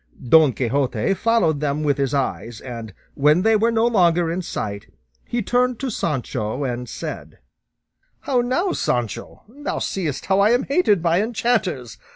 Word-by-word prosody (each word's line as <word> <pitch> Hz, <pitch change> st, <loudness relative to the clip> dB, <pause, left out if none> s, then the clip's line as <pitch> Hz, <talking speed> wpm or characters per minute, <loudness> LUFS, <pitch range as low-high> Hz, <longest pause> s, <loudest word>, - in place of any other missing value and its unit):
Don 155 Hz, +2 st, +6 dB
Quixote 130 Hz, -, 0 dB
followed 195 Hz, -8 st, +1 dB
them 150 Hz, +1 st, -1 dB
with 145 Hz, -1 st, +1 dB
his 135 Hz, -2 st, 0 dB
eyes, 120 Hz, -5 st, -2 dB
and 115 Hz, -4 st, -7 dB, 0.2 s
when 150 Hz, +5 st, +3 dB
they 225 Hz, 0 st, +4 dB
were 225 Hz, +2 st, +3 dB
no 230 Hz, 0 st, +2 dB
longer 175 Hz, -7 st, +3 dB
in 180 Hz, +2 st, -2 dB
sight, 100 Hz, -, -5 dB, 0.4 s
he 235 Hz, -1 st, -2 dB
turned 245 Hz, +2 st, +1 dB
to 265 Hz, -2 st, -3 dB
Sancho 125 Hz, -, -2 dB
and 125 Hz, -2 st, -4 dB
said, -, -, -7 dB, 0.8 s
"How 255 Hz, -3 st, +1 dB
now, 300 Hz, +11 st, 0 dB
Sancho? 120 Hz, -, -3 dB
thou 285 Hz, +6 st, -5 dB
seest 165 Hz, -8 st, -3 dB
how 190 Hz, +1 st, +2 dB
I 210 Hz, +4 st, +5 dB
am 245 Hz, -, +2 dB
hated 240 Hz, -, +2 dB
by 170 Hz, +2 st, +3 dB
enchanters! 220 Hz, -, -1 dB
170 Hz, 160 wpm, -21 LUFS, -, 0.8 s, Don